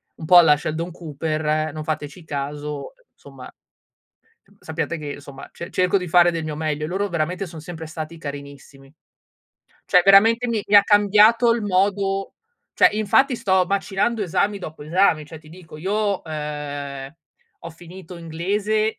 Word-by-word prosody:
un 160 - -9
po' 175 +3 +7
alla 160 -4 +7
Sheldon 160 +4 -4
Cooper, 155 -1 -2
non 155 - -6
fateci 155 +2 -5
caso, 145 0 -5 0.2
insomma - - -13 1.1
sappiate 170 - -4
che, 145 -1 -6
insomma, 140 -1 -11
ce 170 - -9
cerco 185 +1 +2
di 180 -2 -5
fare 175 +1 +5
del 165 -2 -3
mio 155 -1 -5
meglio." 155 -1 -2
Loro 195 +5 -2
veramente 175 +3 -2
son 165 -2 -10
sempre 160 -1 -8
stati 160 +1 -7
carinissimi. 140 -1 -10 0.9
Cioè 180 - +5
veramente 225 +5 +5
mi 225 -4 -1
mi 205 - 0
ha 200 - +8
cambiato 210 +3 +4
il 230 - -3
modo 195 0 0 0.4
cioè - - +6
infatti 215 +6 +2
sto 190 -6 +1
macinando 200 +3 -1
esami 200 +3 0
dopo 155 -5 -9
esami. 165 0 +2
Cioè, 155 +2 -11
ti 155 0 -18
dico 165 -2 -13
io, 200 +3 -1
ehm, 145 -3 -6 0.5
ho 170 - -8
finito 175 +2 -12
inglese 200 +6 -1
170 Hz, 150 wpm, -22 LUFS, 155-195 Hz, 1.1 s, ha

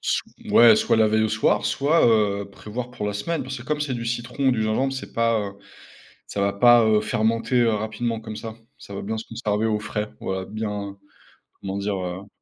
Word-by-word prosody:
Sou - - 0 0.3
ouais, 115 -2 +8
soit - - +2
la 110 -1 +4
veille 110 +1 +2
au 110 - +1
soir 105 -1 +1
soit, 150 +2 +3
heu, 100 -3 +2
prévoir 115 +5 -7
pour 105 -4 -5
la 105 - -1
semaine 160 +11 -2
parce 130 0 -6
que 120 - -9
comme 150 +1 -2
c'est 145 -3 -1
du 115 -1 -4
citron 125 +3 -1
ou - - +4
du 110 -3 0
gingembre, 130 +5 0
c'est 135 - -7
pas, 115 -1 +2
heu, 100 -1 -4 0.8
ça 100 - -3
va 100 0 +2
pas, 120 +3 +6
heu, 110 -1 +4
fermenter, 115 +3 +1
heu, 115 - +4
rapidement 110 +2 -2
comme 110 -1 -8
ça, 110 -1 -7 0.2
ça 100 - -10
va - - -4
bien 110 +2 -3
se 110 - -6
conserver 110 -1 -1
au 105 -1 0
frais, 105 0 -4
voilà, 95 0 -3
bien 105 -2 -5 0.6
comment 95 0 -4
dire, 100 0 -2
heu? 90 +2 -5
110 Hz, 220 wpm, -23 LUFS, 105-120 Hz, 0.8 s, ouais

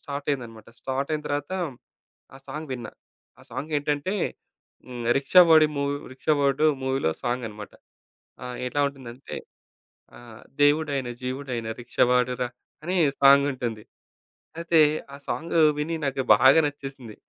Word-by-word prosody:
Start 140 0 -6
అయిందన్నమాట, 115 -5 -5
start 135 +2 -3
అయిన 150 - -3
తరువాత 145 +1 -3 0.9
ఆ - - -14
సాంగ్ 150 +2 -6
విన్నా. 120 -2 -8 0.5
ఆ - - -16
సాంగేంటంటే 145 +3 -2 0.7
హ్మ్, 120 -2 -6
రిక్షావోడి 160 +1 +6
మూవ్ 140 0 0 0.2
'రిక్షావోడు' 145 +1 +1 0.2
మూవీలో 130 -10 0
సాంగ్ 120 0 -2
అన్నమాట. 105 -1 -10 0.7
ఆ! - - -6 0.2
ఎట్లా 145 +3 -1
ఉంటుందంటే, 130 -2 -9 0.8
ఆహ్, 120 -2 -13 0.2
దేవుడైన 145 -3 +2
జీవుడైన 125 -2 -4
రిక్షావాడు 125 +1 +2
రా 125 - +1 0.4
అని 180 +3 -2 0.3
సాంగుంటుంది. 135 -5 +3 0.8
అయితే 170 -1 +2 0.3
ఆ - - -7
సాంగు 165 +1 -1 0.2
విని 155 +3 -2
నాకు 135 -1 -1
బాగా 130 +8 +6
నచ్చేసింది. 135 -6 -7
135 Hz, 120 wpm, -25 LUFS, 125-145 Hz, 0.9 s, రిక్షావోడి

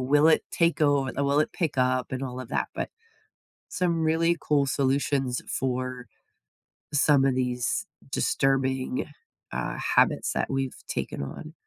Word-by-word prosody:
will 145 +4 +4
it 160 - +4
take 170 -3 +2
over 145 -3 +3
will 140 +2 +3
it - - 0
pick 165 -7 -2
up 130 0 +1
and 130 - -3
all 125 -1 -5
of 125 - -8
that, - - 0
but, - - -3 0.8
some 170 -3 0
really 165 +2 +3
cool 145 -2 +2
solutions 135 -1 0
for 130 -1 -2 0.9
some 145 -1 +4
of 135 -2 +2
these 125 - -1 0.3
disturbing, 130 -2 +1 0.5
uh, 65 - -3 0.2
habits - - +3
that - - -1
we've 135 -1 -2
taken - - -3
on. 155 - -8
135 Hz, 145 wpm, -27 LUFS, 130-150 Hz, 0.9 s, will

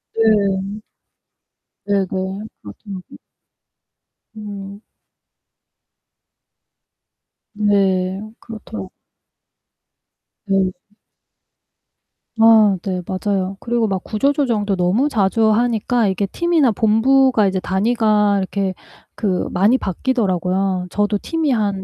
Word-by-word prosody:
네. 205 -2 +1 1.1
네네. 200 -2 +1 0.6
맞아요. 185 - -9 1.3
음. 200 -1 -8 2.7
네, 195 -2 +1 0.2
그렇더라 160 - -8 1.6
네. 195 -2 +1 1.6
아 220 -3 +5
네 185 -2 -2
맞아요. 190 0 -2
그리고 235 -1 0
막 190 -2 -2
구조조정도 230 -4 0
너무 190 +11 +1
자주 220 -1 +2
하니까 235 0 +1
이게 195 +1 -1
팀이나 335 - +2
본부가 225 +2 +3
이제 190 0 -1
단위가 210 +1 +1
이렇게 190 0 -2 0.8
많이 205 +8 +3
바뀌더라고요. 190 -4 -1
저도 205 0 0
팀이 325 +3 -2
한 205 -5 0
205 Hz, 175 characters per minute, -19 LUFS, 190-225 Hz, 2.7 s, 아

